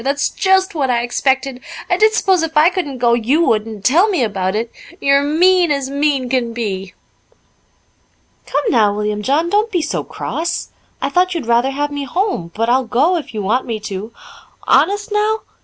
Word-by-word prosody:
"That's 280 +2 0
just 380 0 +1
what 280 -5 -1
I 240 -1 +1
expected. 265 +1 -1 0.3
I - - +2
did 435 +1 +3
s'pose 380 -5 +2
if 325 -1 -2
I 315 +4 +6
couldn't 295 -8 -4
go 240 -1 +2
you 255 +8 +2
would, 215 0 +1
and 215 -3 -9
tell 345 +11 +4
me 360 -11 +1
about 190 -3 -2
it. 230 +2 -2 0.3
You're 275 -2 +3
mean 350 +4 +3
as 275 -2 -1
mean 280 -2 0
can 245 -2 -1
be." 195 -5 -4 1.5
"Come 285 +2 -1
now, 210 -4 +3
William 210 0 -2
John, 290 +9 +1
don't 425 +2 +1
be 350 -5 0
so - - -2
cross. 340 +2 -4 0.3
I - - 0
thought 365 0 +1
you'd 330 - -3
rather 235 +3 +2
have 290 +2 -2
me 285 -1 -4
home, 350 - -2
but 230 +1 0
I'll 255 +2 +2
go, 265 +10 +2
if 330 - -4
you 210 - -3
want 240 +8 0
me 225 -2 -3
to." 205 +1 -6 0.6
"Honest, 410 +3 +2
now?" 425 +1 +1
275 Hz, 190 wpm, -17 LUFS, 235-345 Hz, 1.5 s, I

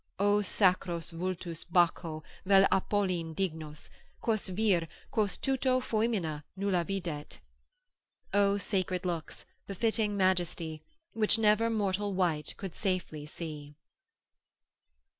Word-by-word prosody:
O 205 +1 +3
sacros 180 -4 +1
vultus 170 -1 -4
Baccho 170 -2 +1 0.2
vel 195 0 +6
Apolline 185 -4 0
dignos, 155 -5 -4 0.3
Quos 220 -3 0
vir, 185 -4 +2 0.2
quos 210 -3 +1
tuto 260 -1 +1
foemina 215 -11 -1
nulla 190 -3 +1
videt! 170 -6 -4 1.0
———O 200 0 +4
sacred 185 -2 -1
looks, 170 -3 -4 0.2
befitting 210 +1 0
majesty, 175 -4 0 0.3
Which 220 0 +4
never 220 +1 +4
mortal 205 -2 0
wight 165 -5 0
could 190 -4 -6
safely 180 -6 -2
see. 150 -2 -7
185 Hz, 105 wpm, -31 LUFS, 165-205 Hz, 1.0 s, vel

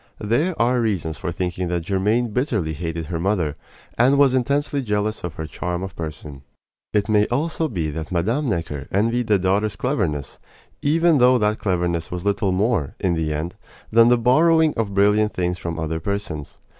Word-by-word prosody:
There 145 - 0
are 120 +1 +2
reasons 90 -8 -2
for 85 - -3
thinking 90 +1 -3
that 85 -1 -2
Germaine 105 +6 +1
bitterly 105 - -1
hated 80 +1 -4
her 85 0 -4
mother, 85 -5 0 0.4
and 130 +4 +5
was 140 -2 +5
intensely 140 +2 0
jealous 105 -2 -1
of 85 -2 -5
her 80 - -5
charm 90 +3 -4
of 95 -2 -7
person. 75 -3 -7 0.5
It 105 0 +1
may 105 -1 +3
be - - -9
also 160 +5 0
that 80 - -4
Mme. 115 - 0
Necker 80 -7 -3
envied 115 +4 +1
the 105 -2 +4
daughter's 100 +3 0
cleverness, 95 - -2 0.4
even 160 +1 +3
though 125 +1 +6
that 105 -1 0
cleverness 85 -3 -1
was 90 +1 -5
little 100 -1 +1
more, 95 - 0
in 90 - +1
the 80 -2 -1
end, 75 +4 -4 0.3
than 115 +1 +6
the 120 0 +5
borrowing 155 +6 +4
of 105 -3 -2
brilliant 105 +2 +3
things 90 0 -1
from 85 -2 -4
other 80 0 -2
persons. 90 -5 -4
100 Hz, 180 wpm, -22 LUFS, 85-120 Hz, 0.5 s, though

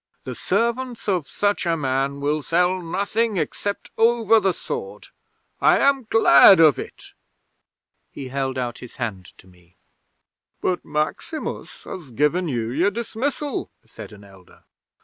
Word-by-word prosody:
"The - - -6
servants 235 +4 -2
of 180 -7 0
such 205 0 -1
a 165 -1 +1
man 135 0 -1
will 150 +2 0
sell 180 +4 +1
nothing 200 +5 -1
except 200 +5 -4
over 225 -1 +4
the 195 -2 +1
sword. 465 - -7 0.5
I - - +5
am 275 -4 +2
glad 190 -4 +7
of 155 -4 +5
it." - - -10 1.0
He 135 -2 -8
held 135 0 -3
out 120 -2 -3
his 125 - -12
hand 105 -7 -5
to - - -18
me. 90 -1 -23 0.8
'"But 180 -1 -1
Maximus 155 - -4
has 165 -7 -9
given 150 +8 0
you 120 -5 -2
your 170 +10 +2
dismissal," 235 +6 -4 0.2
said - - -11
an 105 -1 -14
elder. 95 -2 -19
170 Hz, 140 wpm, -22 LUFS, 135-225 Hz, 1.0 s, glad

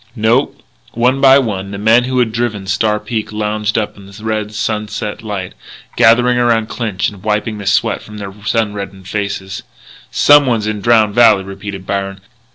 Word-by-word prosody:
"No." 115 +4 +2 0.4
One 125 +4 +1
by 135 0 +7
one 100 -7 -2
the 100 - -6
men 110 +4 +3
who 130 0 -2
had 120 -3 +2
driven 110 -4 -2
Star 105 +2 0
Peak 110 -2 -4
lounged 105 0 -2
up 110 -2 -2
in 100 -1 -13
the 100 +2 -13
red 110 -1 -2
sunset 105 -1 -3
light, 100 -4 -5 0.4
gathering 120 +2 +4
around 115 -2 +1
Clinch 105 -4 -2
and 100 -2 -14
wiping 105 +1 -2
the 100 - -7
sweat - - +1
from 105 - -11 0.3
sun 110 -3 0
reddened 100 -2 -7
faces. 100 -1 -4 0.5
"Someone's 130 -7 +4
in 105 -1 -3
Drowned 110 -2 +3
Valley," 105 -4 +5
repeated 95 0 -8
Byron. 100 0 -3
105 Hz, 165 wpm, -15 LUFS, 100-115 Hz, 0.5 s, by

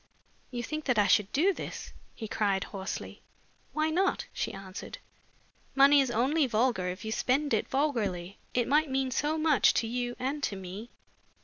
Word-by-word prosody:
"You 240 -1 -4
think 305 +5 -4
that 250 -4 +1
I 205 - +5
should 205 0 +3
do 365 +8 +3
this?" - - -7 0.2
he 220 - -6
cried, 200 -2 0
hoarsely. 195 -2 -6 0.5
"Why 310 +1 0
not?" 375 +4 +1
she - - -2
answered. 195 -1 -8 0.8
"Money 280 +1 +7
is 265 - 0
only 265 +6 +2
vulgar 225 -5 +1
if 185 +3 -5
you 220 - -3
spend 275 +6 +1
it - - +1
vulgarly. 205 - -1 0.2
It 245 -1 +2
might 300 +2 +3
mean 265 -1 0
so 295 +5 0
much 310 -3 +4
to - - +1
you 245 +1 -3
and 275 +4 -2
to 205 - -1
me." 190 +5 -8
250 Hz, 175 wpm, -29 LUFS, 205-290 Hz, 0.8 s, Money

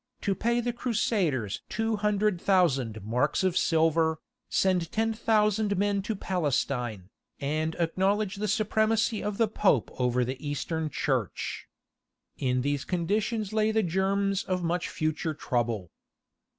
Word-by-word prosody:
to 200 - 0
pay 235 +4 0
the 240 0 -1
Crusaders 195 - 0
200,000 195 - +1
marks 125 - 0
of 185 -2 +1
silver, 160 -1 +2 0.3
send 180 -3 +1
ten 225 +1 +1
thousand 215 -2 +2
men 200 0 +1
to 215 +2 -3
Palestine, 135 - -2 0.3
and 155 +3 -1
acknowledge 190 +4 0
the 210 +1 -1
supremacy 220 +1 +1
of 205 -1 -2
the 225 - +3
Pope 195 - +2
over 125 0 +2
the 130 +3 -5
Eastern 155 +2 -2
Church. 130 -9 -2 0.7
In 125 -2 +1
these 145 -1 0
conditions 210 +4 -1
lay 215 0 +2
the 220 0 +2
germs 195 +2 +1
of 185 -1 -2
much 175 +1 -1
future 155 0 -2
trouble. 115 - -2
185 Hz, 125 wpm, -28 LUFS, 145-210 Hz, 0.7 s, the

